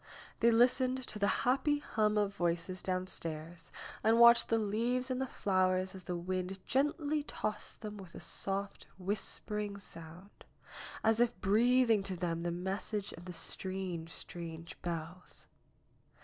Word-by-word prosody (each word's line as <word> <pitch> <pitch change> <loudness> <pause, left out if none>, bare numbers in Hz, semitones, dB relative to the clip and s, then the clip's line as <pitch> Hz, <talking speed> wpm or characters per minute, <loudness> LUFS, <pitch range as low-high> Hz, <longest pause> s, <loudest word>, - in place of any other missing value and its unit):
They 235 - +5
listened 250 +2 +4
to 210 - -7
the 200 - +3 0.2
happy 270 +4 +3
hum 215 -7 +1
of 205 -1 +1
voices 175 0 -1
downstairs 170 -3 -4 0.3
and 225 +2 +5
watched 235 0 +8
the 225 - +3
leaves 235 +5 0
and 255 0 -1
the 265 - 0
flowers 185 -3 +1
as 190 -1 -10
the 180 - -2
wind 185 +2 -2
gently 295 +2 +1
tossed 215 -7 -5
them 210 -1 -6
with 185 -4 -11
a - - -7
soft, 195 +1 -2
whispering 205 +1 -2
sound, 175 0 -11 0.6
as 225 0 +4
if 235 -5 +2
breathing 230 +2 +4
to 195 -1 -4
them 170 -1 -2
the 175 - -1
message 190 +4 -3
of 170 - -11
the 180 - -6
strange, 180 -1 -4
strange 165 0 -7
bells. 170 +1 -6
195 Hz, 145 wpm, -34 LUFS, 180-230 Hz, 0.6 s, watched